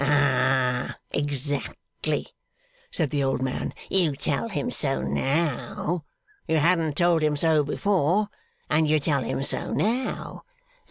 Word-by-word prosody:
'Ah! 130 -3 +2
Exactly,' 145 -1 -1 0.6
said 160 -6 -1
the 145 -2 0
old 135 -1 0
man. 130 -1 -2 0.2
'You 170 -7 +2
tell - - -1
him - - -2
so 65 - +1
now. 145 - -1 0.4
You 160 - +2
hadn't 160 -1 +2
told 170 -2 +3
him 150 -1 +1
so 160 0 +3
before, 190 +5 +1 0.4
and 155 0 +2
you 155 0 +4
tell 140 -2 +1
him 130 +3 -2
so - - +1
now. 240 +5 -2
150 Hz, 125 wpm, -25 LUFS, 135-165 Hz, 0.6 s, you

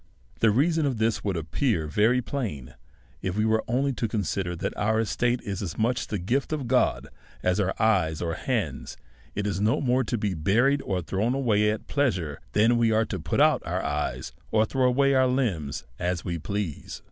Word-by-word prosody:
The 115 - +4
reason 150 +7 +2
of 130 -4 -1
this 110 +1 0
would 100 -4 -1
appear 85 - 0
very 110 +11 +2
plain^ 100 - -4 0.5
if 95 +1 -3
we 110 - +2
were 110 0 +2
only 135 +4 +1
to 120 - -2
consider 95 -4 -2
that - - -3
our 110 +1 +1
estate 120 +2 0
is 100 -3 -4
as 95 -5 -5
much 120 +3 0
the 105 - -2
gift 120 - -1
of 145 -5 -2
God 125 +1 +2 0.4
as 90 +2 +2
our 95 -1 0
eyes 90 -8 +2
or 85 - -2
our - - -1
hands, - - -3 0.4
and 100 - -2
is 100 -2 -1
no 105 +2 +2
more 130 -1 +2
to 120 - -1
be 105 -2 -1
buried, 120 - +2
or 95 -7 -2
thrown 100 - 0
away 105 -6 +2
at 110 - -3
pleasure, 95 - -1
than 115 +3 +4
we 115 -1 +3
are 110 +1 +3
to 95 - -4
put 80 -1 -2
out - - +4
our - - -2
eyes^ 75 -1 -2 0.2
or 110 0 +3
throw 130 +3 +1
away 140 +2 +3
our 130 -1 +4
limbs 95 - -1 0.2
as 90 -2 -2
we 85 -2 -2
please. 100 -3 -4
110 Hz, 205 wpm, -26 LUFS, 90-125 Hz, 0.5 s, The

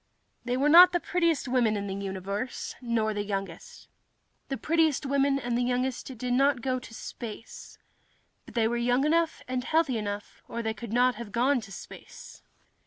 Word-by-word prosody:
They 250 0 0
were 280 +3 +2
not 355 +4 +9
the 350 - +2
prettiest 335 -3 0
four 250 - -4
women 230 -4 +3
in 200 - -3
the 195 - -4
universe, 200 +4 -4
nor 230 -3 0
the 205 0 -2
youngest. 205 - -6 0.6
The 270 - -2
prettiest 315 -2 +1
women 275 0 +2
and 245 -3 -2
the 245 - +1
youngest 250 +1 -2
did 245 +2 -2
not 270 -1 +2
go 255 -1 0
to 235 - -12
space. 225 0 -9 0.7
But - - -13
they 225 -2 +3
were 240 +1 -1
young 245 +3 +2
enough 330 +1 +1
and 255 0 -2
healthy 310 -5 +1
enough, 205 -1 -6
or 235 - -4
they 220 0 -1
could 220 0 -8
not 250 +2 +3
have 230 -3 -7
gone 250 +4 +2
to 195 - -11
space. 485 - -11
245 Hz, 185 wpm, -28 LUFS, 220-280 Hz, 0.7 s, not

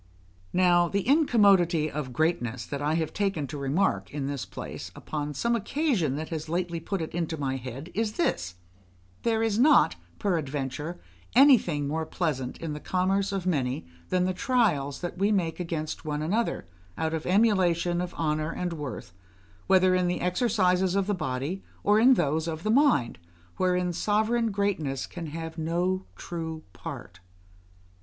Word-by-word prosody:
Now, 175 -1 +4
the 200 +4 -2
incommodity 200 - +4
of 145 -4 -4
greatness 125 -6 0
that 140 -1 -5
I 150 +2 +1
have 160 -2 -1
taken 195 -7 -1
to 140 +2 -6
remark 140 +8 0
in 145 -2 -3
this 140 -2 -3
place, - - -7
upon 150 -1 -4
some 235 - +1
occasion 225 - 0
that 155 +2 -4
has 155 -1 -5
lately 170 0 -1
put 190 +1 -3
it 160 - -7
into 165 -1 -2
my 135 -2 -1
head, 130 +6 -7
is 215 0 -1
this: 90 - -1 0.7
there 225 -1 +1
is 220 -1 +1
not, 290 +4 +5 0.2
peradventure, 150 -2 -2 0.4
anything 225 - +5
more 160 +2 -2
pleasant 135 -8 -2
in 160 -2 -4
the 150 - -5
commerce 190 +4 0
of 195 -2 -3
many 135 - 0 0.2
than 180 -1 +2
the 185 - 0
trials 185 - +1
that 175 0 -5
we 200 +2 +3
make 175 -6 0
against 165 -3 -4
one 150 -1 -2
another, 215 +9 -1 0.3
out 160 0 -1
of 160 -1 -3
emulation 180 -4 +3
of 180 0 -5
honour 155 -1 0
and 175 0 -3
worth, 145 - -6 0.5
whether 185 -1 +5
in 180 -1 +2
the 175 - -1
exercises 185 -2 +2
of 200 -1 +2
the 205 - 0
body 155 +2 -3 0.2
or 210 +1 +4
in 255 +3 +7
those 160 -2 0
of 160 0 -4
the 215 - +1
mind, 240 - +3 0.4
wherein 180 -1 +1
sovereign 220 +5 +1
greatness 195 -10 -1
can 170 -2 -7
have 160 +1 -6
no 180 +4 0
true 160 -2 -5
part. 85 - -8
175 Hz, 165 wpm, -27 LUFS, 150-195 Hz, 0.7 s, in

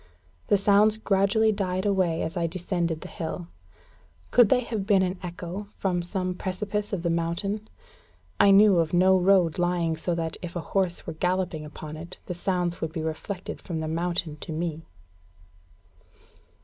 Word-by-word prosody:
The 205 - +4
sounds 205 +2 +4
gradually 215 +1 +2
died 190 -2 -2
away 185 -5 +1
as 160 - -4
I 170 -2 0
descended 170 -2 -2
the - - -7
hill. 170 +1 -5 0.8
Could 240 -4 +6
they 250 - +4
have 220 -5 -4
been 195 -3 +4
an 185 0 -2
echo 180 +3 -6
from 180 -3 0
some 185 +1 -2
precipice 205 +3 -3
of 190 -4 -2
the 170 - +1
mountain? 185 +6 -2 0.7
I 200 - +7
knew 195 -2 +7
of 165 0 0
no 185 +2 +5
road 185 -3 +3
lying 175 -2 +1
so 170 +2 -2
that, 165 -1 -3
if 175 -1 -7
a - - -1
horse 185 -3 0
were 165 - -4
galloping 180 -2 -1
upon 150 0 -8
it, 165 +2 -9
the - - -4
sounds 175 -1 -1
would 160 - -2
be 160 -2 -3
reflected 175 +4 -5
from 165 -3 -4
the 160 - -3
mountain 165 -1 -1
to 160 - -7
me. 160 0 -3
180 Hz, 170 wpm, -26 LUFS, 170-195 Hz, 0.8 s, I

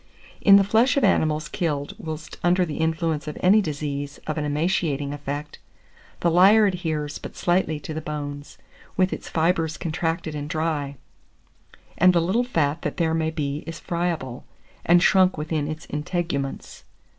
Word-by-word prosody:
In 195 - +8
the 200 - +7
flesh 225 +7 +3
of 275 - +2
animals 155 -5 +2
killed 150 -6 -2
whilst 155 -1 -7
under 180 +1 +3
the 155 -3 -5
influence 160 -1 -1
of 150 - -5
any 200 +4 +5
disease 145 -3 -4
of 155 - -2
an 150 - -2
emaciating 150 -2 0
effect, 145 +1 -6 0.6
the 170 - +2
lyer 200 +5 +6
adheres 160 -6 -2
but - - -9
slightly 175 -3 +1
to 150 +3 -6
the 155 - -4
bones, 145 -1 -6 0.4
with 185 0 +2
its - - -7
fibres 165 -1 0
contracted 165 -1 -2
and 145 0 -5
dry; 155 -4 -2 1.0
and 185 +1 +6
the 175 - +4
little 190 +9 +1
fat 160 - 0
that - - -4
there 165 -3 +1
may 160 -1 0
be 145 -3 -3
is 165 0 -6
friable, 170 -8 -3 0.4
and 175 +1 +5
shrunk 190 -3 +4
within 150 -1 -2
its 155 +1 -6
integuments. 150 -2 -4
160 Hz, 160 wpm, -24 LUFS, 150-175 Hz, 1.0 s, In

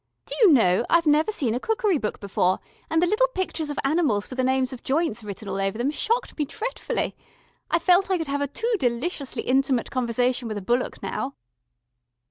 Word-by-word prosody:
Do - - -5
you 410 -6 +8
know, 225 -7 +4
I've 340 0 +4
never 305 +6 +3
seen 260 - 0
a 245 - -1
cookery 425 - +1
book 210 - -3
before, 185 -2 +1 0.3
and 320 +2 +2
the - - +5
little 430 +7 +3
pictures 340 -5 -2
of 290 - -4
animals 275 -8 +1
with 255 - -6
the 260 - +1
names 260 0 +1
of 250 - -9
joints 270 -5 0
written 205 0 -7
all 195 0 -2
over 195 +2 -1
them 250 +5 0
shocked 465 +10 -1
me 295 - +2
dretfully. 445 - -3 0.6
I - - +3
feel 355 +2 +5
I 375 - +2
could 325 - -3
have 285 0 -2
a 285 - 0
too 460 - -2
deliciously 255 0 -2
intimate 265 -1 +1
conversation 245 0 0
with 215 -2 -4
a - - -4
bullock 240 +5 -1
now." 275 +1 -3
270 Hz, 205 wpm, -25 LUFS, 235-335 Hz, 0.6 s, you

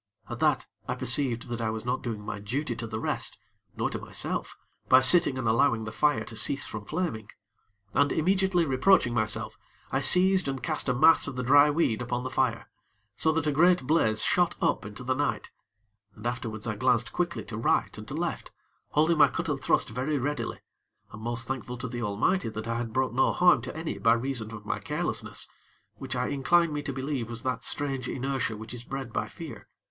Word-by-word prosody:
At - - -5
that, - - +2 0.2
I - - -2
perceived 125 -5 +1
that 120 -1 -4
I 110 - -1
was 110 +1 -5
not 125 +1 -1
doing 110 -5 -5
my 105 - -5
duty 120 +5 -3
to 115 0 -6
the 110 0 -5
rest, - - -1 0.4
nor - - 0
to - - -4
myself, - - -3 0.3
by 130 - +8
sitting 130 0 +6
and 130 -3 -2
allowing 115 0 +2
the 110 - -6
fire 150 +6 +1
to 115 - -9
cease 135 +5 +1
from 105 -1 -7
flaming; 150 - -3 0.6
and 145 - +2
immediately 185 +1 +1
reproaching 135 -1 +3
myself, 110 -2 -1 0.3
I - - +1
seized 185 -1 +7
and 135 -3 -4
cast - - 0
a 125 - +1
mass 160 +6 +5
of - - -5
the 125 - -3
dry 145 +4 +6
weed 145 -7 0
upon 125 0 -3
the 130 - -5
fire, 120 -3 -1 0.5
so 160 +8 +2
that 160 -1 -1
a 150 - +1
great 175 0 +3
blaze 110 -8 +2
shot 180 -1 +2
up - - 0
into 105 +4 -9
the 130 +1 0
night, 145 +2 -2 0.6
and 105 - -13
afterwards 120 -3 -4
I 110 -3 -3
glanced 125 0 +1
quickly 175 -1 -2
to 110 - -7
right 115 - 0
and - - -10
to - - -6
left, - - -3 0.4
holding 155 +2 +2
my 145 - +8
cut 165 +4 -4
and 140 -2 -2
thrust - - +1
very 130 +7 -2
readily, 145 +3 -3 0.5
and 110 - -9
most 115 +1 -3
thankful 125 -1 -5
to 125 +2 -5
the 120 0 -5
Almighty 115 - 0
that 110 0 -6
I 115 0 -2
had 120 -1 -4
brought 130 0 0
no 130 - +2
harm 180 -1 +4
to - - -7
any 160 0 -4
by 115 0 +4
reason 120 -2 -2
of 105 -2 -9
my - - -2
carelessness, - - -3 0.5
which - - -6
I - - -1
incline 155 +4 +2
me 145 - -2
to 145 - -4
believe 130 -3 -4
was 115 +1 -5
that 125 -2 -2
strange 135 -4 -1
inertia 130 -4 -2
which 110 +2 -9
is 120 -1 -7
bred 135 -2 -6
by - - -2
fear. - - -10
130 Hz, 210 wpm, -27 LUFS, 115-145 Hz, 0.6 s, by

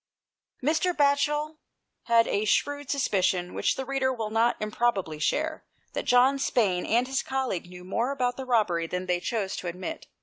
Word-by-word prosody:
Mr. 320 +5 +1
Batchel 295 +2 +2 0.5
had 230 -1 +4
a 205 +2 0
shrewd 285 +5 0
suspicion, 185 -9 +1
which - - +1
the 265 - -4
reader 270 0 0
will 225 -4 -4
not 230 +2 +2
improbably 210 -7 -1
share, 310 - -1 0.3
that - - -3
John 255 +3 +4
Spayne 195 -9 +1
and 235 +3 +3
his 265 0 0
colleague 260 -10 -3
knew 180 0 -11
more 230 +7 -1
about 250 -3 -1
the 265 - -6
robbery 190 -9 +1
than 180 +2 -3
they 180 -1 0
chose 200 0 -2
to 180 - -5
admit. 185 - -6
240 Hz, 170 wpm, -27 LUFS, 190-275 Hz, 0.5 s, had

